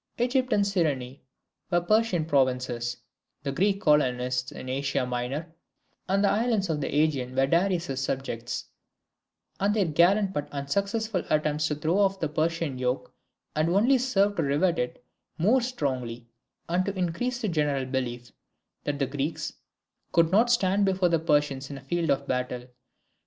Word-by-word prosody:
Egypt 255 +1 +1
and 205 - +3
Cyrene 145 -9 -1 0.5
were 175 -2 +3
Persian 190 -2 +2
provinces; 125 -4 0 0.5
the 140 - -2
Greek 195 +7 +1
colonists 125 -5 +2
in - - -8
Asia 135 0 -1
Minor 125 +7 -3 0.6
and 195 +1 +2
the - - +5
islands 215 -4 +1
of 150 -2 -2
the - - -1
AEgean 140 -4 0
were 135 0 +4
Darius's 170 -3 +1
subjects; 120 -3 -3 0.9
and 205 +2 +2
their 205 -3 +3
gallant 185 +5 +3
but 145 0 -3
unsuccessful 200 +8 -1
attempts 150 0 +1
to 150 - -1
throw 160 +6 0
off 195 -1 +2
the 160 - 0
Persian 155 -3 -1
yoke 125 +1 -2 0.4
had 155 +2 +2
only 230 +9 +4
served 205 -5 +2
to - - +2
rivet 155 +5 +1
it 125 0 -4 0.3
more 220 +10 +3
strongly, 130 - -3 0.4
and 175 +2 +1
to 200 -1 -3
increase 190 +8 -1
the 220 - -1
general 150 -6 0
belief: 125 -2 -3 0.5
that 145 -1 -1
the 140 - +1
Greeks 145 +4 -3 0.6
could 165 -1 +4
not 225 +5 +4
stand 200 -4 +3
before 190 -2 +2
the 165 -1 +2
Persians 145 -4 +1
in 140 - -6
a - - -10
field 165 +5 -1
of 140 +1 +1
battle. 125 -1 -2
155 Hz, 155 wpm, -27 LUFS, 135-195 Hz, 0.9 s, the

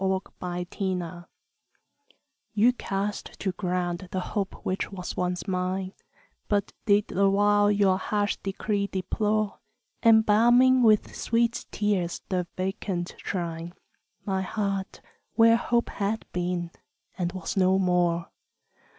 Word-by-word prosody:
XI - - 0
=Lost 190 0 -1 0.5
Hope= 180 -3 -3 1.3
You 230 +4 +5
cast 200 -3 -4
to 195 - -1
ground 180 0 -2
the 190 - -1
hope 200 -3 -1
which 185 +2 -2
once 185 -2 -6
was 180 +1 -2
mine, 185 0 -2 0.5
But 205 -1 0
did 205 0 +3
the 195 +1 +3
while 205 +1 +4
your 200 -2 +3
harsh 205 +1 0
decree 200 +1 -2
deplore, 210 +3 -1 0.4
Embalming 235 +3 +5
with 215 -3 +3
sweet 235 0 0
tears 200 -5 -1
the 180 -2 -1
vacant 185 -2 -3
shrine, 170 -1 -4 0.5
My 190 -1 0
heart, 195 0 -3 0.3
where 230 0 +6
Hope 235 0 +1
had 210 +2 -2
been 175 -1 -2 0.4
and 175 -2 -2
was 185 -3 -4
no 190 0 +4
more. 175 -2 +1
195 Hz, 120 wpm, -27 LUFS, 180-210 Hz, 1.3 s, where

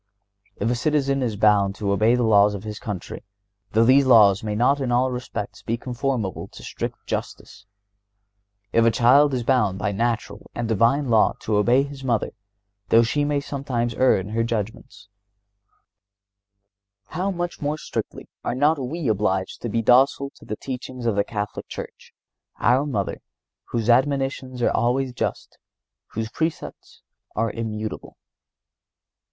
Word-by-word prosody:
If 110 +4 -1
a - - +1
citizen 140 0 +1
is 115 -4 -1
bound 100 -2 +3
to 100 -2 -2
obey 110 +4 +3
the 125 - +1
laws 105 -2 +4
of 100 - -7
his 105 -1 -6
country, 105 -6 -6 0.5
though 110 +1 +4
these 135 +3 +6
laws 105 -5 +6
may 105 -1 -2
not 130 +6 +3
in 130 -2 -1
all 125 +2 +2
respects 120 -4 -5
be 115 - -2
conformable 125 -5 -3
to - - -11
strict - - -6
justice; - - -6 1.1
if 115 - +4
a 115 - +5
child 135 +6 +5
is 125 -2 -1
bound 115 -7 +2
by 105 +1 -1
natural 110 -1 -2
and 120 -1 -2
divine 115 +6 +2
law 110 -3 +4
to 110 - -1
obey 120 +6 +4
his 140 -1 -9
mother, 120 -5 0 0.6
though 115 +1 +6
she 145 +6 0
may 145 0 +1
sometimes 135 -4 -3
err 130 +2 +4
in 95 +1 -5
her 115 +2 0
judgments, 115 0 -5 2.0
how 185 +4 -2
much 175 -2 -4
more 150 +1 -1
strictly - - -5 0.2
are - - -2
not 145 +3 +2
we 145 +4 -3
obliged 95 -3 0
to 120 - -3
be 115 +2 -1
docile 135 +3 +4
to - - -17
the 110 - -4
teachings 130 0 -7
of 115 -3 +1
the 100 - +2
Catholic 105 -1 -5
Church, - - -9 0.5
our 130 +5 +3
Mother, 105 -9 -3 0.4
whose 115 -2 -3
admonitions 130 0 +1
are - - +3
always 125 +2 0
just, - - -4 0.5
whose 110 0 -3
precepts 160 0 -5 0.3
are 115 0 0
immutable! 110 -1 -5
120 Hz, 155 wpm, -23 LUFS, 110-135 Hz, 2.0 s, these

